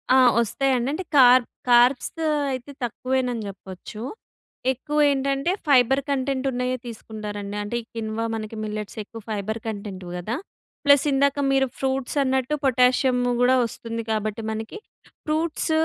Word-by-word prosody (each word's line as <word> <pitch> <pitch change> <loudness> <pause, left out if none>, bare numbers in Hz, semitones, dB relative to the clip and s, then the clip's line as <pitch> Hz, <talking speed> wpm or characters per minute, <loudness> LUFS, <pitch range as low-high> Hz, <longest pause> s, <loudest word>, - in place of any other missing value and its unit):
ఆ! - - +7 0.2
వస్తాయండి 255 +2 0
అంటే 370 +4 -3
కార్ 250 -1 +8 0.3
కార్బ్స్ 245 +2 +5 0.4
అయితే 255 +1 -5
తక్కువేనని 250 -1 -1
చెప్పొచ్చు. 195 +2 -9 0.7
ఎక్కువేంటంటే 275 +2 +1 0.2
ఫైబర్ 270 0 +5
కంటెంట్ 270 -1 -1
ఉన్నయే 250 0 -1
తీసుకుంటారండి. 210 -3 -6
అంటే 205 +3 -4
ఈ - - -15
కిన్వా 225 0 -2
మనకి 215 0 -5
మిల్లెట్స్ 210 0 -5
ఎక్కువ 225 +2 -10
ఫైబర్ 215 +1 -3
కంటెంట్‌వి 200 -4 -6
కదా. 215 +7 -3 0.5
ప్లస్ 285 -1 +6
ఇందాక 280 +1 +2
మీరు 270 0 +3
ఫ్రూట్స్ 265 +1 -2
అన్నట్టు 265 +2 0
పొటాషియం 255 0 +3 0.2
కూడా 255 +1 +5
వస్తుంది 230 0 -5
కాబట్టి 215 0 -2
మనకి. 220 - -5 0.5
ఫ్రూట్స్ 315 +1 -1
250 Hz, 125 wpm, -24 LUFS, 220-270 Hz, 0.7 s, కార్